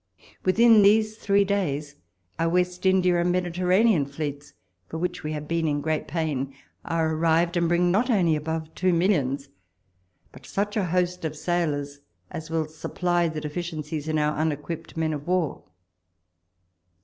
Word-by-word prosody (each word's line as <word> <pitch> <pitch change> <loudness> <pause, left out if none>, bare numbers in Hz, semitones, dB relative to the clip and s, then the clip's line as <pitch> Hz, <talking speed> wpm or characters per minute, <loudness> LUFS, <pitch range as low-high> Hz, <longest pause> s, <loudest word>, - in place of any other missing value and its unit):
Within 225 +3 +6
these 215 +2 +4
three 200 -2 +2
days, 150 -8 -1 0.4
our 165 0 +2
West 180 +1 0
India 180 -2 +3
and 175 +1 +1
Mediterranean 180 0 +2
fleets, 145 0 -6 0.3
for 160 - -6
which 180 +1 -3
we 155 0 -4
have 150 -1 -5
been 165 0 0
in 145 -1 0
great 155 +1 -2
pain, 140 -5 -2 0.3
are 160 -1 0
arrived, 165 +2 +2
and 170 -1 +2
bring 175 +1 +3
not 225 +8 +2
only 180 -9 +3
above 160 +1 -4
two 185 -1 +1
millions, 145 -7 +1 0.8
but 130 +1 -14
such 205 +1 -2
a 205 -4 +1
host 180 0 0
of 155 -1 -3
sailors 145 -5 -1 0.3
as 160 -3 -7
will 160 -1 0
sujiply 170 +2 -1
the 155 -1 -5
deficiencies 155 -1 -4
in 155 0 0
our 150 0 +1
un 160 0 +2
equipped 150 +3 -7
men 160 -1 0
of 145 +1 -6
war. 180 -5 -1
165 Hz, 160 wpm, -25 LUFS, 150-180 Hz, 0.8 s, Within